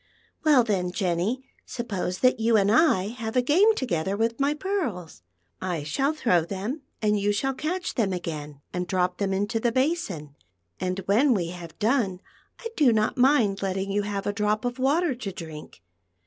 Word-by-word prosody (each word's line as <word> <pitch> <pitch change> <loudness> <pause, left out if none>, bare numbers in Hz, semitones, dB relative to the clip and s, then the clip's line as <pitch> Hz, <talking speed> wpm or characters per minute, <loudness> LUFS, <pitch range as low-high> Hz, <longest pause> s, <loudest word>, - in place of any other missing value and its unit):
Well, 295 -6 +6
then, 190 -5 -1
Jenn\, 185 +7 -1 0.2
suppose 200 -6 -4
that 255 -1 +4
you 225 0 +3
and 200 0 +3
I 220 - +4
have 225 -1 -5
a 250 - +5
game 385 - +4
together 190 - -1
with 230 +3 0
my 280 +2 +2
pearls. 265 - -3 0.4
I 175 -5 -2
shall 270 - 0
throw 230 - +2
them, 200 - -4 0.2
and 210 -1 +2
you 205 +1 +1
shall 270 +6 0
catcii 350 +7 -3
them 215 -6 0
again 150 -5 -5
and 180 0 -2
drop 180 0 0
them 200 -1 0
into 205 +4 0
the 235 +1 +1
basin; 240 - -1 0.4
and 185 0 -2
when 235 +7 +4
we 175 -4 -1
have 175 -2 -9
done, 220 -5 +1 0.4
I 460 - -5
do 280 -6 +5
not 215 -1 +1
mind 245 -7 +3
letting 195 0 -2
you 205 +1 +1
have 200 -1 -3
a 205 - 0
drop 210 +2 0
lo 245 - +1
THE - - -18
PEARL 260 - 0
FOONTAIN. 305 +5 +3
of - - -1
water - - -2
to 200 - -3
drink. 155 - -10
210 Hz, 195 wpm, -26 LUFS, 185-255 Hz, 0.4 s, Well